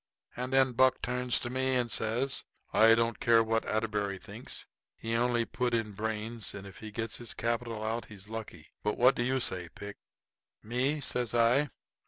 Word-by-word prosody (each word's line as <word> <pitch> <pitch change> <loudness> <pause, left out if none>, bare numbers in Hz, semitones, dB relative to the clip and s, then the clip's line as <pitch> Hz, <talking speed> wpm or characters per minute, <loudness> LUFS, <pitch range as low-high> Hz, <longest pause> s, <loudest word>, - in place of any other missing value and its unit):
And 125 +1 -3
then 135 -1 +4
Buck 130 +1 +4
turns 125 -2 +1
to 120 - -3
me 130 0 +1
and 120 -2 0
says: 120 +5 0 0.3
"I 115 +1 +7
don't 115 0 0
care 115 -1 +5
what 115 0 0
Atterbury 105 -3 -1
thinks. 90 - -7 0.3
He 115 0 -4
only 120 0 +2
put 125 0 -1
in 110 -2 -1
brains, 110 +2 -3
and 100 -1 -7
if 95 -2 -11
he 110 - -8
gets 110 +1 -4
his 120 -2 -4
capital 115 -1 -2
out 115 +2 -2
he's 100 -2 -11
lucky. 110 0 -7
But 105 - -1
what 125 +2 +6
do - - -2
you 130 +2 +1
say, 90 -8 -1
Pick?" 100 0 -8 0.7
"Me?" 130 +7 0
says 120 -4 0
I. 120 +5 +4
115 Hz, 185 wpm, -31 LUFS, 110-125 Hz, 0.7 s, I